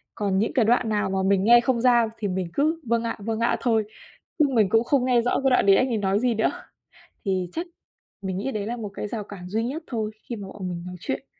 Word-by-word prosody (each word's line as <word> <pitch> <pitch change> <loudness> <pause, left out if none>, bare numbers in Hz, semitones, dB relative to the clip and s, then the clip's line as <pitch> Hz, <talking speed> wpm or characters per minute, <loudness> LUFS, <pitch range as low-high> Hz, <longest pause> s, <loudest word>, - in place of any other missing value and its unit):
còn 200 -2 0
những 220 - 0
cái 245 -6 +3
đoạn 235 0 +2
nào 210 -2 0
mà 190 - -1
mình 195 -1 +3
nghe 240 +2 +7
không 235 -1 0
ra 240 -2 +4
thì 210 -2 -2
mình 185 -1 -2
cứ 315 +3 +1
"Vâng 235 0 +1
ạ, 230 - -3
vâng 220 +2 -3
ạ" 230 - +1
thôi, 225 -4 +2 0.6
chứ 300 - +6
mình 215 -5 +3
cũng 225 +2 +3
không 255 +1 +1
nghe 245 -2 +3
rõ 245 - 0
cái 270 - +4
đoạn 250 - +3
đấy 195 - +7
anh 260 - +2
ấy 235 - -1
nói 200 -1 +1
gì 245 +1 +1
nữa. 220 - +2 0.7
Thì 185 -3 -1
chắc 340 +2 -3 0.5
mình 190 -1 -3
nghĩ 270 +7 -2
đấy 205 -2 -3
là 240 +2 -3
một 215 -3 -5
cái 210 - -4
rào 215 -1 -4
cản 180 -3 -10
duy 220 +3 -1
nhất 285 +7 -4
thôi 220 -3 -3
khi 235 - -5
mà 200 -2 -8
bọn 190 -1 -6
mình 170 -1 -5
nói 180 - -7
chuyện. 270 +5 -4
225 Hz, 270 wpm, -24 LUFS, 200-245 Hz, 0.7 s, nghe